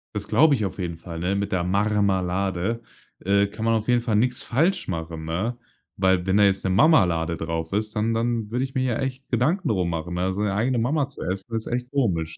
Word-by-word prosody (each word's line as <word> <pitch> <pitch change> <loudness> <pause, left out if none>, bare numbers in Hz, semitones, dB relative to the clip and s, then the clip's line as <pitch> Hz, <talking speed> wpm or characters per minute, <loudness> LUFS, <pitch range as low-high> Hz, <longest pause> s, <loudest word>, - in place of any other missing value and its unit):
Das 105 0 -3
glaube 155 0 +5
ich 115 -6 0
auf 95 - -5
jeden 85 -3 -4
Fall, 85 0 -8
ne, 90 +3 0
mit 100 0 -2
der 90 -2 +1
Marmalade, 100 +1 0 0.4
äh, 100 +1 +2
kann 105 +2 -6
man 115 - +3
auf 110 -1 -1
jeden 120 -1 +4
Fall 115 -3 -1
nix 125 +3 +1
falsch 165 +11 +1
machen, 80 -2 -5
ne, 95 +9 -2 0.4
weil 95 -1 +2
wenn 95 +1 +3
da 105 - +5
jetzt 95 -1 +2
'ne - - +1
Mamalade 90 - +3
drauf 80 0 -4
ist, 110 +2 -2
dann 110 +1 +1
dann 115 -1 -1
würde 125 +2 0
ich 135 0 -6
mir 130 - +1
ja 120 -3 0
echt 135 0 -4
Gedanken 135 - +1
darum 90 -5 +1
machen, 85 +1 -4
ne, 90 +2 0
seine 100 +1 -1
eigene 120 +5 +1
Mama 135 +5 +1
zu 140 - -9
essen, 95 +1 -3
das 115 -1 -3
ist - - -4
echt 125 0 -2
komisch. 85 - -1
105 Hz, 235 wpm, -24 LUFS, 90-120 Hz, 0.4 s, glaube